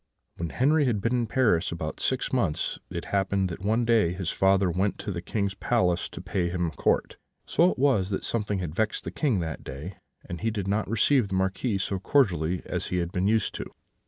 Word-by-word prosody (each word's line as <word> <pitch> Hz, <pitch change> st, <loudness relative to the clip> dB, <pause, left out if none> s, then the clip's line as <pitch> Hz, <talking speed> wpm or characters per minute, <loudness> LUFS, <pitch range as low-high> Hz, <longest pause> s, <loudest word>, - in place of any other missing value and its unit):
"When 85 Hz, -1 st, -3 dB
Henri 145 Hz, -, +3 dB
had 115 Hz, -5 st, +1 dB
been 115 Hz, +5 st, 0 dB
in 120 Hz, -2 st, +1 dB
Paris 110 Hz, -9 st, +2 dB
about 80 Hz, -2 st, -4 dB
six 130 Hz, 0 st, -1 dB
months, 95 Hz, -12 st, 0 dB
it -, -, -5 dB
happened 95 Hz, -1 st, +1 dB
that 85 Hz, -, -7 dB
one 110 Hz, +4 st, +1 dB
day 110 Hz, -7 st, +3 dB
his 90 Hz, -2 st, -3 dB
father 95 Hz, -1 st, +3 dB
went 95 Hz, +4 st, 0 dB
to 105 Hz, -, -4 dB
the 85 Hz, -2 st, -4 dB
King's 100 Hz, +1 st, -2 dB
palace 90 Hz, -7 st, +1 dB
to -, -, -9 dB
pay 90 Hz, -1 st, -1 dB
his 85 Hz, -2 st, -1 dB
court: -, -, 0 dB, 0.3 s
so 175 Hz, +2 st, +4 dB
it -, -, -3 dB
was, 125 Hz, -9 st, +2 dB
that 95 Hz, -, -2 dB
something 105 Hz, -3 st, -1 dB
had 90 Hz, -5 st, -4 dB
vexed 110 Hz, +4 st, -1 dB
the -, -, -5 dB
King 125 Hz, -, +1 dB
that 80 Hz, -2 st, -5 dB
day, 75 Hz, +8 st, -7 dB, 0.3 s
and 85 Hz, -1 st, -6 dB
he 115 Hz, -, +1 dB
did 105 Hz, -3 st, -3 dB
not 105 Hz, 0 st, 0 dB
receive 115 Hz, +2 st, +3 dB
the 95 Hz, -, -3 dB
Marquis 95 Hz, +4 st, 0 dB
so 95 Hz, 0 st, -2 dB
cordially 90 Hz, -, +2 dB
as -, -, -3 dB
he 90 Hz, -, -1 dB
had 85 Hz, -1 st, -1 dB
been 90 Hz, +2 st, 0 dB
used 110 Hz, 0 st, +1 dB
to -, -, -5 dB
do. -, -, -13 dB
95 Hz, 220 wpm, -27 LUFS, 90-115 Hz, 0.3 s, so